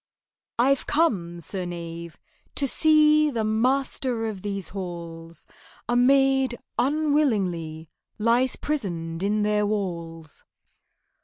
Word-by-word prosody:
"I've 265 +3 +2
come, 185 - +1
Sir 185 +3 -3
Knave, 170 -1 -7 0.4
to 280 - +2
see 305 +1 +4
The 230 -5 -1
master 245 +1 0
of 210 -4 -4
these 200 -3 -3
halls: 170 -3 -7 0.4
A 240 - +1
maid 265 0 +3 0.2
unwillingly 220 - 0 0.3
Lies 235 +4 +2
prisoned 170 - -3
in 210 +2 +1
their 210 0 +1
walls." 170 -6 -4
210 Hz, 100 wpm, -25 LUFS, 170-265 Hz, 0.4 s, see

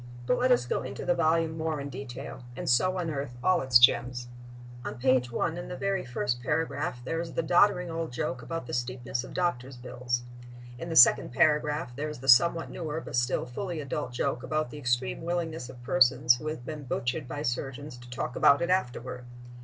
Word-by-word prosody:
But 245 - +1
let 255 +1 +2
us 185 - +4
go - - -1
into 130 0 -6
the 175 - +3
volume 165 -1 +1
more 160 -1 -2
in 140 0 -5
detail, 130 -1 -7 0.2
and - - -5
so 185 +10 +3
unearth 145 -7 -4
all 185 -2 +3
its 130 -2 +6
gems. 120 0 +3 0.5
On - - -5
page 125 -1 +2
1, 165 +7 -1
in 175 - -7
the 180 - -6
very 195 -1 -1
first 120 0 -2
paragraph, 140 -2 -2
there 165 +4 -2
is 170 -1 -7
the 165 - -1
doddering 180 +1 +3
old 165 -3 -3
joke 125 +1 -3
about 145 +5 -5
the - - -8
steepness 120 0 -3
of - - -10
doctors' 135 -8 -1
bills. 120 0 -3 0.6
In 165 - -6
the 165 - -3
second 120 - +7
paragraph 150 -1 +1
there 150 +3 -3
is 150 - -7
the 135 - -9
somewhat 165 +6 +5
newer 160 -2 -4
but 165 - -7
still 120 +1 +1
fully 170 +7 -5
adult 135 -3 -4
joke 120 0 -1
about 155 -4 -2
the 150 - -8
extreme 125 -1 -1
willingness 165 -5 -3
of 125 -2 -12
persons 125 -1 +4
who 150 - -7
have 155 -6 -5
been 150 -1 -6
butchered 125 +3 -2
by 145 +3 -5
surgeons 135 +2 -4
to 120 0 -13
talk 125 0 -4
about 140 +4 +5
it 175 - 0
afterward. 125 -7 -2
135 Hz, 205 wpm, -28 LUFS, 125-165 Hz, 0.6 s, second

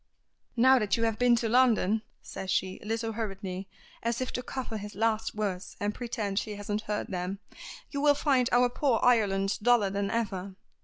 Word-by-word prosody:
"Now 260 +2 +6
that 210 -1 +1
you 230 - -1
have 225 -1 0
been 245 -1 +5
to 230 0 0
London," 225 -3 +3 0.2
says 190 - -7
she, 190 0 0
a - - -10
little 225 +1 -1
hurriedly, 195 -4 -5 0.3
as 235 0 -1
if 255 - -2
to 250 - -3
cover 250 -3 -5
his 205 -1 -8
last 220 +1 0
words 200 -3 -3
and 205 +1 -1
pretend 215 -5 -2
she 210 - -5
hasn't 205 +1 -3
heard 210 -1 -3
them, 185 +1 -3 0.5
"you 280 - -2
will 290 0 +5
find 270 -4 +2
our 245 0 +5
poor 245 -1 +1
Ireland 200 -5 +3
duller 220 -4 +4
than 200 0 -1
ever. 195 -4 -3
220 Hz, 190 wpm, -29 LUFS, 200-240 Hz, 0.5 s, Now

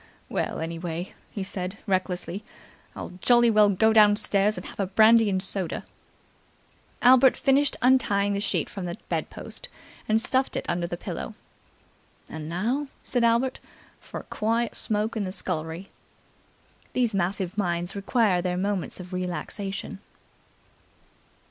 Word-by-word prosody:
"Well, - - -2
anyway," 165 +2 -4 0.2
he 200 - -4
said 190 +1 -4
recklessly, 185 0 -1 0.5
"I'll - - -6
jolly 240 -1 +5
well 210 -1 +6
go 220 +3 +3
downstairs 210 -1 +4
and - - -6
have - - -10
a 195 - 0
brandy 220 +3 +5
and 190 -1 0
soda!" 190 -3 -3 1.2
Albert 255 +1 +7
finished 275 +1 +2
untying 205 -6 +3
the 200 - -1
sheet - - 0
from 195 -3 -6
the 175 -1 -5
bedpost, - - -4 0.4
and 220 +1 +4
stuffed 260 +3 +1
it - - -2
under 170 0 -1
the 175 - -4
pillow. - - -6 0.9
"And 155 -1 -7
now," 235 - -1 0.2
said 245 -2 0
Albert, 235 +3 +2 0.4
"for - - -8
a - - -11
quiet 230 +2 0
smoke 215 +1 -1
in 215 - -1
the 185 - -3
scullery." 165 0 -4 1.1
These 245 -3 +1
massive 190 0 -1
minds 175 -2 -1
require 200 -2 +2
their 180 0 -1
moments 195 -1 -2
of 180 0 -9
relaxation. 185 +2 -4
200 Hz, 135 wpm, -26 LUFS, 180-225 Hz, 1.2 s, Albert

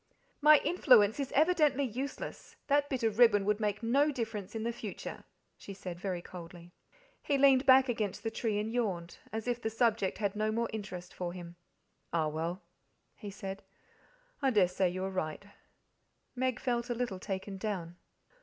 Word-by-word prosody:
"My 300 +1 +8
influence 250 - +4
is 275 - -2
evidently 300 -3 +3
useless 260 +3 -5
that 285 0 +2
bit 260 -3 -2
of 220 0 0
ribbon 205 -5 +6
would 210 +1 +1
make 210 +1 -1
no 280 +6 +3
difference 225 -6 -5
in 220 - -3
the 235 +1 -1
future," 220 -4 -7 0.3
she 200 - -9
said 180 -3 -7
very 180 -2 -3
coldly. 175 0 -11 0.5
He 285 - +1
leaned 270 -1 +5
back 260 0 +7
against 215 -5 -2
the 225 - -2
tree 220 -2 -1
and 215 +2 -2
yawned, 185 -8 -2
as 220 +1 -4
if 245 -1 -1
the 220 - -1
subject 225 -4 +1
had 200 -1 -1
no 215 +1 0
more 230 +1 -1
interest 185 -4 -6
for 175 -1 -4
him. 175 -1 -9 0.6
"Ah 160 -2 +1
well," 165 +4 -3 0.5
he 205 - -8
said, 195 0 -6 0.8
"I 270 - +3
dare 205 -7 +4
say 180 +1 +1
you 185 +1 -4
are 190 - -2
right." 185 0 -3 0.9
Meg 255 -1 -1
felt 245 -1 -1
a 240 - -1
little 235 -6 -3
taken 195 0 -5
down. 180 -5 -4
215 Hz, 175 wpm, -32 LUFS, 185-245 Hz, 0.9 s, My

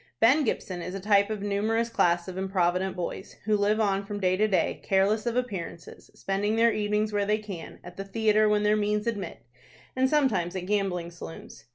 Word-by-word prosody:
Ben 260 +7 +5
Gibson 185 -7 -2
is 180 +2 -5
a - - -4
type 200 +1 +3
of 215 -2 -4
a - - -3
numerous 220 +3 0
class 175 -5 +2
of 185 - -6
improvident 190 -1 0
boys, 180 +2 -5
who 215 -1 +3
live 210 +1 +2
on 200 -2 +1
from 205 0 -5
day 185 -1 +2
to 215 +3 +2
day, 195 -3 0
careless 205 +3 +1
of 235 - 0
appearances, 200 -9 -5
spending 205 +2 -1
their 230 0 +4
evenings 210 0 0
where 205 -1 0
they 210 +1 +2
can, 200 -6 -8
at 175 0 -11
the 195 - -4
theatre 215 +1 +2
when 210 0 +2
their 210 0 +3
means 210 0 0
admit, 195 - -4 0.5
and 260 0 +2
sometimes 220 - +1
at 180 -1 -4
gambling 185 -4 -1
saloons. 170 -1 -10
205 Hz, 205 wpm, -27 LUFS, 185-215 Hz, 0.5 s, Ben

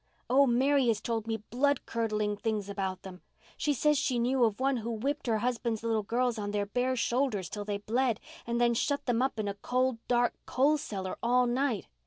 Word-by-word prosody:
Oh, 275 +2 +6
Mary 265 +2 +3
has 225 -3 +2
told 225 -1 -3
me 225 -1 -1
blood 280 +3 +1
curdling 215 -2 -1
things 210 -1 -2
about 195 -2 -3
them. 185 -1 -10 0.3
She 295 - 0
says 295 +1 +2
she 255 - 0
knew 250 +2 +2
of 220 -1 -1
one 270 0 +2
who 230 0 -4
whipped 260 +6 -2
her 225 -2 +2
husband's 235 -1 -1
little 225 -1 +1
girls 240 +2 0
on 205 -1 -3
their 205 0 -1
bare 250 +5 0
shoulders 240 - 0
till 205 -1 -5
they 205 -1 -2
bled, 235 +3 0 0.3
and 235 0 0
then 240 0 +4
shut 285 +4 0
them 245 -1 +1
up 265 -2 0
in 210 - -1
a 200 - -1
cold, 250 +4 0
dark 240 -1 +2
coal 290 +4 +3
cellar 190 -7 -5
all 250 +1 +3
night. 245 -3 0
235 Hz, 210 wpm, -30 LUFS, 215-255 Hz, 0.3 s, Oh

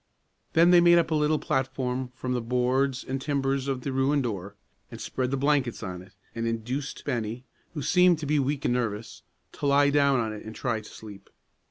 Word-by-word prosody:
Then 170 +2 +5
they 175 -1 +7
made 175 0 +6
up 170 -1 +1
a - - +2
little 150 0 +2
platform 130 -3 -2
from 130 0 -3
the 125 - -1
boards 125 +3 0
and 135 0 -4
timbers 135 -1 -1
of 135 -2 -2
the 135 - -3
ruined 135 +2 +2
door, 100 -4 -4 0.3
and - - -9
spread 125 -1 -2
the 135 - -1
blankets 140 -3 0
on 90 -1 -5
it, 95 +1 -16 0.2
and 115 0 -3
induced 125 +5 -4
Bennie, 120 +1 -3 0.3
who 145 - -3
seemed 180 +1 +4
to 155 - -5
be 150 +1 +2
weak 140 +1 -1
and - - +2
nervous, 115 -3 -3 0.3
to 145 - -3
lie 140 0 +4
down 140 -2 +3
on 110 -2 -2
it 105 - -8
and 110 0 -9
try 115 -4 -2
to 105 - -13
sleep. 105 -3 -12
130 Hz, 210 wpm, -27 LUFS, 115-145 Hz, 0.3 s, they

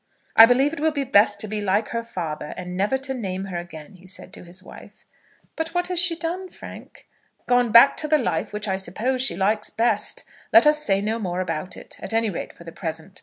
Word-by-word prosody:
"I 225 - +10
believe 270 +5 +3
it 330 - -6
will 315 +2 +2
be 285 -2 -2
best 210 -5 +3
to 215 - -2
be 210 0 -3
like 205 +2 0
her 230 0 -3
father, 160 -9 -5
and 180 0 -6
never 205 +8 +1
to 265 0 -4
name 195 -6 -4
her 180 -3 -4
again," 170 +2 -11
said 185 - -9
he - - -24
to - - -10
his 180 +1 -8
wife. - - -14 0.5
"But 325 +1 -4
what 355 0 0
has 360 -2 0
she 350 -1 +3
done, 345 +3 -4
Frank?" - - -12 0.4
"Gone 245 -2 +2
back 235 +5 +7
to 305 - -3
the 305 0 +4
life 230 - -2
which 210 +1 -4
I 190 -1 0
suppose 240 +7 -1
she 260 - +1
likes 210 +3 0
best. 230 +2 0 0.3
Let 340 - +7
us 300 0 +3
say 195 -4 +2
no 220 +2 -2
more 180 -4 -3
about 180 0 -4
it, - - -8
at - - -5
any 225 -1 +1
rate 170 - -6
for - - -15
the 165 - -9
present. 165 +2 -6
215 Hz, 235 wpm, -23 LUFS, 185-265 Hz, 0.5 s, I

